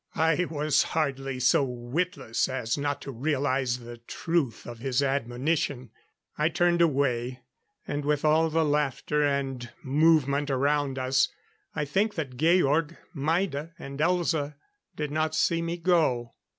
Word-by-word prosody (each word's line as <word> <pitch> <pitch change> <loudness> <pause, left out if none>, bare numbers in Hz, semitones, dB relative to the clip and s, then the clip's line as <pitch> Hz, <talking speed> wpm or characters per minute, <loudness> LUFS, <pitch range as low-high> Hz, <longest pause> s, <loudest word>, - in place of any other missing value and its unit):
I 160 +2 +2
was 150 -1 +2 0.2
hardly 135 -3 -1
so 125 +3 +4
witless 125 - -2
as 125 -3 -1
not 145 0 -2
to 140 - -6
realize 130 -1 0
the 120 -1 -10
truth 135 +1 -2
of 120 -1 -8
his 130 +2 0
admonition. 135 0 -1 0.5
I 155 +2 +3
turned 175 0 +2
away; 130 -5 +1 0.5
and 145 0 -2
with 150 +1 0
all 160 +1 +4
the 160 0 +2
laughter 150 0 0
and 135 -4 -1
movement 145 0 +3
around 140 0 +1
us, 130 +1 +2 0.5
I 150 - -1
think 200 +9 0
that 135 -6 -4
Georg, 160 +1 +2 0.2
Maida 160 +1 -1
and 140 +1 -8
Elza 160 -3 +1 0.4
did 150 -1 -3
not 155 +1 0
see 165 +1 +2
me 170 +1 -3
go. 160 -9 +1
145 Hz, 135 wpm, -27 LUFS, 130-160 Hz, 0.5 s, so